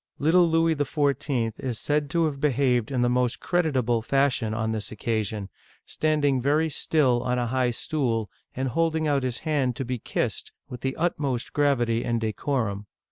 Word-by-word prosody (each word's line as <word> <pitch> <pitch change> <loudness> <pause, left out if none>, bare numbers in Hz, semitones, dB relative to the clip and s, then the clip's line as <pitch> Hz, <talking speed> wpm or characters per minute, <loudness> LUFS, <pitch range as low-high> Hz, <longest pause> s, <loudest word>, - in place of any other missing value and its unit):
Little 170 +4 +4
Louis 165 0 +3
XIV. 140 -5 0
is 125 -4 -3
said 145 +2 0
to 165 +2 +2
have 140 -3 -3
behaved 130 -5 +2
in 130 -3 0
the - - +3
most 125 -1 +1
creditable 130 -10 +1
fashion 130 -3 +1
on 110 0 -1
this 110 -2 -4
occasion, 110 -2 -2 0.4
standing 145 -4 +1
very 150 +5 +2
still 135 -5 +2
on 125 0 -1
a 120 - 0
high 125 +1 +1
stool, 120 -3 -1 0.3
and 130 +1 -1
holding 160 +2 +1
out 140 -2 +2
his 125 -2 -2
hand 140 -6 +1
to 135 - -4
be 125 0 -3
kissed, - - -2 0.2
with 125 -2 -8
the 135 0 -2
utmost 145 -7 -1
gravity 120 -6 +2
and 115 -1 0
decorum. 110 -2 -2
130 Hz, 170 wpm, -26 LUFS, 120-150 Hz, 0.4 s, Little